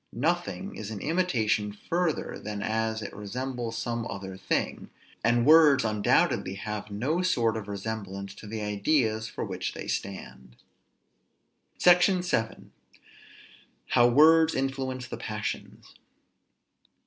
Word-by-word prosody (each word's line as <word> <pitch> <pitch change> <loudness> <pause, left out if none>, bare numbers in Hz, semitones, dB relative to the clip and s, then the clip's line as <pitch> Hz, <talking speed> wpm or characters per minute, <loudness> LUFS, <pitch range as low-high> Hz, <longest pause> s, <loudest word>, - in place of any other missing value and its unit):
Nothing 175 - -2
is 105 - -6
an 110 -2 -5
imitation 120 - 0
further 165 - -2
than 105 -1 -5
as 110 0 -1
it - - -7
resembles 120 +2 -4
some 115 -1 -3
other 95 -1 -6
thing; 95 - -2 0.3
and 120 +1 +3
words 150 -5 +7
undoubtedly 105 -2 +1
have 105 +1 -5
no 130 - -1
sort 120 - +1
of 110 -2 -5
resemblance 100 -1 -5
to 105 - -12
the 110 +1 -5
ideas 110 +2 0
for - - -5
which - - -4
they - - -6
stand. 65 -10 -5 1.2
SECTION 180 +1 +5
VII. 115 -10 -2 1.2
HOW 120 - +5
WORDS 160 +5 +6
INFLUENCE 130 -1 -2
THE - - -6
PASSIONS. 105 0 -6
115 Hz, 120 wpm, -28 LUFS, 105-140 Hz, 1.2 s, words